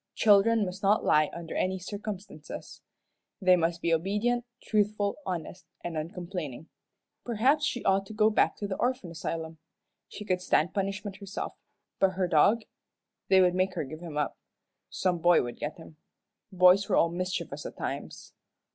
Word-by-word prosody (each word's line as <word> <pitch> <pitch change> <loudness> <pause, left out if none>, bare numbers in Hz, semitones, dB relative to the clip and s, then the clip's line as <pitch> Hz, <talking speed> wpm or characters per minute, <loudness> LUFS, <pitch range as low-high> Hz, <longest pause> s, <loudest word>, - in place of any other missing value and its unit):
Children 215 +1 +5
must 185 +1 -6
not 205 +1 +3
lie 150 0 +4
under 170 -1 -7
any 190 +1 0
circumstances. 195 -4 -7 0.6
They 185 -2 +5
must 170 0 -1
be 170 - +2
obedient, 210 +8 0 0.2
truthful, 210 -1 0
honest, 180 +1 -5 0.2
and 170 -1 -4
uncomplaining. 165 -3 -5 0.5
Perhaps 260 +6 +2
she 245 - -3
ought 195 0 +2
to 220 - -8
go 215 0 +3
back - - +2
to 205 - -4
the 190 - -3
orphan 245 -8 -1
asylum. 160 0 -5 0.5
She 210 - -9
could 180 -2 0
stand 175 -2 +2
punishment 195 0 -3
herself 200 0 -5 0.5
but 190 -1 +3
her 185 -1 0
dog? 200 +8 +4 0.7
They 190 0 +6
would 180 -1 +4
make 185 +1 0
her 175 - -1
give 155 +3 -8
him 165 -3 -7
up. 150 - -2 0.5
Some 180 -2 0
boy 175 +1 +5
would 120 -1 -7
get 150 +1 -4
him. 160 -2 -13 0.5
Boys 185 +2 +5
were - - +3
all 170 - +4
mischievous 170 -5 -3
at - - -11
times. - - -6
185 Hz, 165 wpm, -29 LUFS, 170-205 Hz, 0.7 s, They